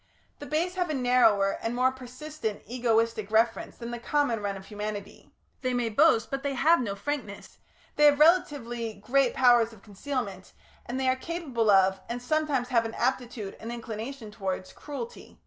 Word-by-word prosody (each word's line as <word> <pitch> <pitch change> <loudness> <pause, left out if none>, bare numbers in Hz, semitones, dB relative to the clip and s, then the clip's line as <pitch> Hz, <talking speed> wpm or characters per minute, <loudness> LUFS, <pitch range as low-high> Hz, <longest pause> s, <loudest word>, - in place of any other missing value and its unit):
The 290 - -8
Base 335 +4 0
have 360 -2 -1
a 305 - -1
narrower 245 -6 +3
and 230 +1 -2
more 255 +1 +3
persistent 260 -2 -6
egoistic 230 -3 0
reference 225 +1 +1
than 235 0 -6
the 240 - -5
common 245 -3 0
run 200 -1 -2
of 190 - -11
humanity; 210 -1 -7 0.3
they 255 -1 -1
may 240 -2 0
boast, 225 +1 +3
but 275 0 -2
they 280 -1 -2
have 310 +4 +4
no 200 -5 -3
frankness; 210 -2 -5 0.4
they 295 - +6
have 290 -1 +6
relatively 245 -9 +2
great 250 +6 +1
powers 240 -3 +5
of 205 - -17
concealment, 205 -3 -5 0.3
and 245 +2 -3
they 265 - 0
are 255 - +3
capable 260 -7 -2
of, 190 -1 +4
and 240 +1 -3
sometimes 275 -1 0
have 230 -2 +2
an 225 - -5
aptitude 240 -5 -2
and 230 - -6
inclination 230 0 -6
towards, 190 -2 -4
cruelty. 265 -6 -8
240 Hz, 175 wpm, -28 LUFS, 215-275 Hz, 0.4 s, they